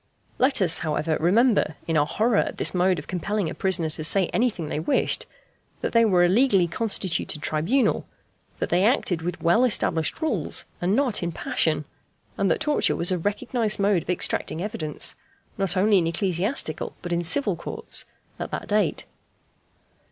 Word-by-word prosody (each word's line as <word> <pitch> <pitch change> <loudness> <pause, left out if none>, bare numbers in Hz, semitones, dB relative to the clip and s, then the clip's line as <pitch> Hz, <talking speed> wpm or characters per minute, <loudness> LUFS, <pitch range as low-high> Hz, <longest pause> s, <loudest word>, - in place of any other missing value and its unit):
Let 260 -5 +3
us, 170 -1 +5
however, 155 0 -1
remember 200 - +2
in 165 - -2
our 145 -1 +2
horror 220 +5 +1
at - - -1
this - - +2
mode 180 0 +2
of 150 - -7
compelling 185 -1 -3
a - - -5
prisoner 175 -4 +1
to 155 - -4
say 185 +3 +4
anything 215 -9 -1
they 150 - -3
wished, 255 - 0 0.5
that - - -2
they 230 -1 +4
were 180 -4 +3
a - - +4
legally 200 -2 +3
constituted 180 -4 -1
tribunal; 180 - 0 0.5
that - - -3
they 180 +2 +2
acted 200 - +1
with 175 +1 -5
well 170 +9 +3
established 165 -9 0
rules, 315 -1 0 0.2
and 185 +4 +1
not 260 -5 +1
in 170 -1 -2
passion; 155 -2 0 0.5
and 195 -1 0
that - - 0
torture 300 0 +1
was 170 +2 +1
a 180 - 0
recognized 210 +4 -1
mode 200 -3 +2
of - - -15
extracting 175 -2 -1
evidence, 175 -6 0 0.4
not 195 -3 -1
only 200 +1 +4
in 165 - -1
ecclesiastical 180 - -1
but 175 -1 -3
in 170 - 0
civil 205 +2 0
courts, 165 - -1 0.3
at - - -5
that - - -6
date. 210 0 0
185 Hz, 175 wpm, -24 LUFS, 165-215 Hz, 0.5 s, us